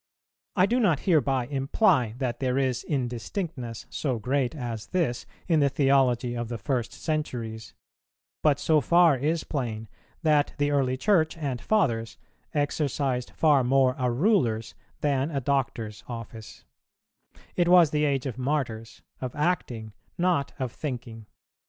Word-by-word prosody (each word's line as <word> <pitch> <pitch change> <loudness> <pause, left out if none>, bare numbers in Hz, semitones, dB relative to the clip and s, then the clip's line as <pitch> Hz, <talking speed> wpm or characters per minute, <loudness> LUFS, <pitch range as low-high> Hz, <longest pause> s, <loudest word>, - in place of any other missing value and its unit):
I 185 -2 +5
do 240 +5 +1
not 175 - +2
hereby 135 -7 +2
imply 135 - +2
that 125 -3 -2
there 130 -1 0
is 130 -3 0
indistinctness 125 - -4
so 130 -5 -1
great 130 +4 -1
as 120 -6 -5
this 150 -10 -1 0.2
in 165 -3 +3
the 140 -1 +4
theology 130 -3 +2
of 120 -1 -3
the 120 - -3
first 120 +2 -2
centuries; 115 -8 -4 0.7
but 150 -3 +3
so 155 0 +3
far 170 +2 +5
is 155 +5 -1
plain, 115 -6 -4 0.4
that 150 -2 +2
the 145 0 +1
early 130 -3 +1
Church 165 -2 +2
and 140 -6 -3
Fathers 115 - 0 0.3
exercised 140 -3 -1
far 150 -4 +4
more 130 0 +3
a 125 -1 +1
ruler's 120 - +1 0.3
than 140 0 +1
a 145 -4 -1
doctor's 120 -5 -2
office: 115 -2 -9 0.9
it 175 -1 +2
was 175 -4 +6
the 150 0 +1
age 140 -2 0
of 130 -2 -4
Martyrs, 120 -5 -3 0.2
of 130 -2 -5
acting 125 - -1 0.2
not 175 -5 +1
of 130 -3 -3
thinking. 120 -6 -6
135 Hz, 140 wpm, -26 LUFS, 120-150 Hz, 0.9 s, was